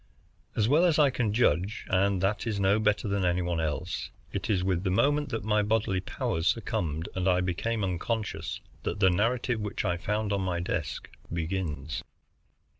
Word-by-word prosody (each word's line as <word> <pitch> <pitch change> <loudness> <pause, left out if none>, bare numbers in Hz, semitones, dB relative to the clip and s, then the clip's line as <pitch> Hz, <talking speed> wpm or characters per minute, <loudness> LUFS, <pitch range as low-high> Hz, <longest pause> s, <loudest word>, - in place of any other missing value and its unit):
As 110 -1 +2
well 150 +7 +5
as 170 -4 +4
I 145 -3 +5
can 120 -4 0
judge, 100 -2 +1
and 95 0 +2
that 105 +4 0
is 105 -3 -1
no 100 +2 +3
better 105 0 +1
than 100 -1 0
any 90 0 +2
one 85 -1 -1
else, 80 +3 -2 0.2
it - - -3
is 95 -4 +2
with 95 -1 0
the 95 - 0
moment 145 +9 +2
that 115 - -3
my 105 0 +2
bodily 105 -2 +1
powers 80 -2 -2
succumbed 80 -1 -1
and 95 0 -1
I 90 0 +4
became 100 +5 -1
unconscious 100 +4 -2 0.2
that - - -3
the 95 -2 +5
narrative 115 +5 +1
which 105 -1 -3
I 85 - +1
found 105 +3 -1
on 100 - 0
my 90 -2 -1
desk 80 -6 -3 0.2
begins. 80 -3 -3
95 Hz, 185 wpm, -29 LUFS, 90-110 Hz, 0.2 s, well